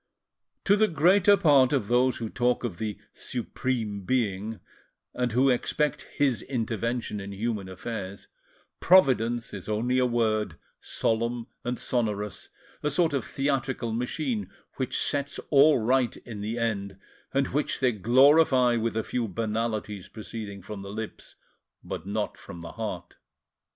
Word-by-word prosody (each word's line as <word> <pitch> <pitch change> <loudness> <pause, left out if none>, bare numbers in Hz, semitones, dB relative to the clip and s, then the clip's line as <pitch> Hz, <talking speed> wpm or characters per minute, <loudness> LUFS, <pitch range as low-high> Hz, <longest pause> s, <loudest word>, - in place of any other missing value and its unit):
To 200 - +5
the 215 +1 +4
greater 185 +5 +5
part 140 -7 +5
of 135 -8 +1
those 125 +1 +3
who 115 - -3
talk 125 +2 0
of 105 -8 -4
the 110 -2 -3 0.2
"Supreme 115 -4 -3
Being," 110 -1 -1 0.5
and 125 -1 -1
who 130 +3 +4
expect 150 +4 0
His 135 -5 +2
intervention 115 -3 -2
in 100 0 -6
human 100 -1 -3
affairs, 100 0 -6 0.5
"Providence" 120 -10 +4
is 100 0 -7
only 120 +4 +1
a 125 - +3
word, 110 -3 0 0.2
solemn 115 +1 -1 0.2
and 125 0 -2
sonorous, 105 -5 -2 0.3
a 150 - 0
sort 160 +1 +2
of 140 - 0
theatrical 135 -4 -1
machine 120 - -2 0.3
which 130 -2 -1
sets 140 -1 -1
all 145 +1 +7
right 125 +2 +1
in 110 -4 -8
the 110 +3 -3
end, 100 -4 -2 0.3
and 135 0 +1
which 150 +3 -1
they 130 -2 +3
glorify 125 - +5
with 115 0 -1
a 110 - 0
few 120 -2 -2
banalities 110 -2 -3
proceeding 105 -3 -7
from 100 +1 -7
the 100 - -8
lips, 110 +2 -7 0.5
but 90 - -6
not 105 +1 -2
from 85 - -10
the 85 - -7
heart. 90 -6 -6
115 Hz, 145 wpm, -27 LUFS, 105-130 Hz, 0.5 s, all